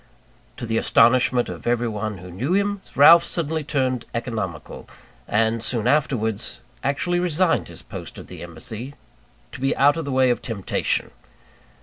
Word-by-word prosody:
To - - -5
the 115 0 0
astonishment 120 +1 +4
of - - -7
everyone 110 -3 -1
who 90 +1 -11
knew 125 - -2
him, 200 0 0
Ralph 165 +4 +8
suddenly 160 -2 -1
turned 130 -4 -1
economical; 110 - -5 0.4
and, 110 +1 +1
soon 115 -1 0
afterwards, 120 -6 0 0.2
actually 175 +6 0
resigned 175 0 +1
his - - -10
post - - -9
at - - -9
the - - -11
embassy, 110 - -7 0.6
to 130 - -9
be 135 - 0
out 145 +3 +4
of 165 - -3
the 140 - -4
way 130 -1 +3
of 120 - -2
temptation! 105 -6 -2
125 Hz, 150 wpm, -22 LUFS, 110-150 Hz, 0.6 s, Ralph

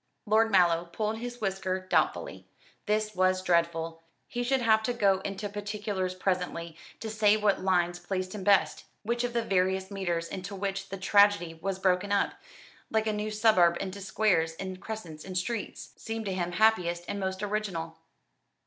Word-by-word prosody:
Lord 220 +2 +4
Mallow 175 -4 +4
pulled 215 +6 -3
his 240 +1 -6
whisker 190 -2 -1
doubtfully. 185 0 -1 0.4
This 215 0 0
was 185 0 +2
dreadful. 165 -2 0 0.3
He 245 - -3
should 260 +1 +1
have 220 -1 +4
to 245 +3 -1
go 200 -5 +3
into 195 +2 -4
particulars 205 -2 -3
presently, 180 -3 -2 0.3
to 225 - -4
say 215 -1 +3
what 210 -2 +2
lines 175 -2 +1
pleased 185 +1 -3
him 205 -3 -6
best, 200 0 +3 0.2
which 235 +2 -1
of 245 -1 -2
the 235 -1 +1
various 190 -1 0
meters 175 -4 -2
into 190 +1 -6
which 195 0 -3
the 195 - -5
tragedy 200 -3 +4
was 185 +4 -3
broken 190 +1 +1
up 200 - +2 0.6
like 220 0 +1
a 215 - 0
new 210 +1 -2
suburb 210 -6 +4
into 195 +1 -5
squares 190 -5 +1
and 185 +1 -6
crescents 175 -9 -7
and 185 -1 -4
streets 225 +4 -4
seemed 225 0 -5
to 195 - -2
him 175 -1 -2
happiest 175 -4 +2
and 200 - -3
most 190 +1 -3
original. 200 -6 -3
195 Hz, 170 wpm, -29 LUFS, 180-215 Hz, 0.6 s, Lord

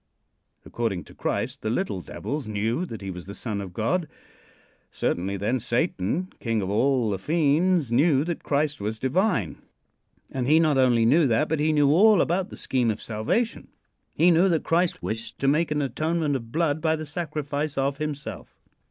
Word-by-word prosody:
According 110 -7 -2
to - - -16
Christ - - -3
the 110 - -2
little 115 - -1
devils 145 - -5
knew 110 - -1
that 110 -7 -8
he 95 - -4
was 90 0 -9
the 100 - -7
Son 105 -4 -4
of 95 -2 -7
God. 155 - -1 0.8
Certainly, 95 +3 -2
then, 110 +7 0
Satan, 125 - 0
king 115 -2 -1
of 95 - -3
all 125 0 +2
the 95 - -2
fiends, 155 - +2
knew 140 +2 +3
that 170 0 -4
Christ 145 -3 -1
was 110 +2 -3
divine. 130 - 0 0.7
And 125 -2 -2
he 155 +3 +5
not 155 -4 +3
only 120 -3 +4
knew 145 +6 +4
that, 125 +6 +2
but 160 - -1
he 155 +1 +2
knew 145 -2 +4
all 205 +5 +6
about 180 +4 +1
the - - -10
scheme 125 -3 0
of 110 - -2
salvation. 115 - -2 0.5
He 175 +2 +5
knew 175 +3 +4
that 165 -3 +1
Christ 170 +1 0
wished 115 +1 -5
to 135 - -1
make 155 +4 +2
an 150 -1 0
atonement 155 +1 -1
of 115 -3 -5
blood 155 -1 0
by 160 0 +2
the 155 0 -6
sacrifice 150 -2 -3
of 135 +1 0
himself. 150 -2 -6
140 Hz, 185 wpm, -25 LUFS, 115-160 Hz, 0.8 s, all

